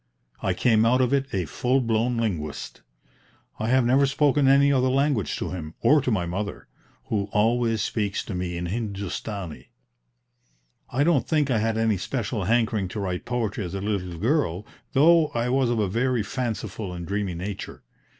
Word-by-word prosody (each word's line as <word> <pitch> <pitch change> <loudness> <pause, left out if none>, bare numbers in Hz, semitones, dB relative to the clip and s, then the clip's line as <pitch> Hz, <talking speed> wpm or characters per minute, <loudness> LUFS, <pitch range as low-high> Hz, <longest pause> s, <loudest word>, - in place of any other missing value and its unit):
I - - 0
came 110 -3 +3
out 120 +3 +3
of 130 +1 +2
it 135 -1 0
a 95 -3 -1
full 125 - +1
blown 115 0 0
linguist. 85 -10 -3 0.8
I 110 - -1
have 130 0 +4
never 135 +3 +4
spoken 140 0 +2
any 140 +1 +5
other 130 -1 +3
language 135 -5 +1
to - - -4
him, 80 -3 -6
or 150 +1 +5
to 130 - -1
my 100 -7 +1
mother, 100 +4 -4 0.4
who 100 -2 -1
always 115 0 +2
speaks 105 -3 -1
to 105 - -5
me 90 -1 -3
in 85 - -3
Hindustani. 100 -3 -5 1.2
I 135 +3 +1
don't 155 -4 +2
think 150 -4 +1
I 115 - +2
had 110 +1 0
any 110 -2 +2
special 105 0 -3
hankering 110 -2 +1
to 105 - -6
write 90 -3 -3
poetry 120 -3 -2
as 90 +1 -5
a - - -2
little 95 -5 -3
child, 105 - 0 0.3
though 160 +3 +5
I 120 +1 0
was 130 -1 +2
of 120 - 0
a 105 -2 +1
very 120 +3 0
fanciful 110 -3 -4
and 85 -1 -6
dreamy 100 -1 -2
nature. 95 +3 -6
110 Hz, 180 wpm, -25 LUFS, 100-130 Hz, 1.2 s, any